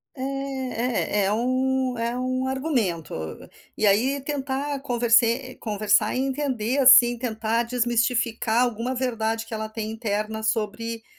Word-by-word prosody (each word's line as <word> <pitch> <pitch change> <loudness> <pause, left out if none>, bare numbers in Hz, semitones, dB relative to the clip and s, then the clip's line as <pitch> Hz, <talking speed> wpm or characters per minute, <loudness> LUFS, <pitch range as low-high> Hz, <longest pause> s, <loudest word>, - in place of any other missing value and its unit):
É, 260 -5 -2
eh, - - +2
é 195 - +1
um 255 +2 0
é 235 +1 -2
um 255 +1 -1
argumento. 255 - -1 0.6
E 215 - +1
aí 240 +8 +3
tentar 280 0 -3
converse 240 0 +2
conversar 210 +1 +1
e - - 0
entender, 265 -2 -1
assim, 245 -2 +7
tentar 225 -1 -1
desmistificar 240 -1 +1
alguma 245 +1 -2
verdade 225 -3 -2
que 225 - -10
ela 220 0 -4
tem 220 0 -5
interna 220 -1 -3
sobre, 225 +1 -2
240 Hz, 130 wpm, -24 LUFS, 220-260 Hz, 0.6 s, assim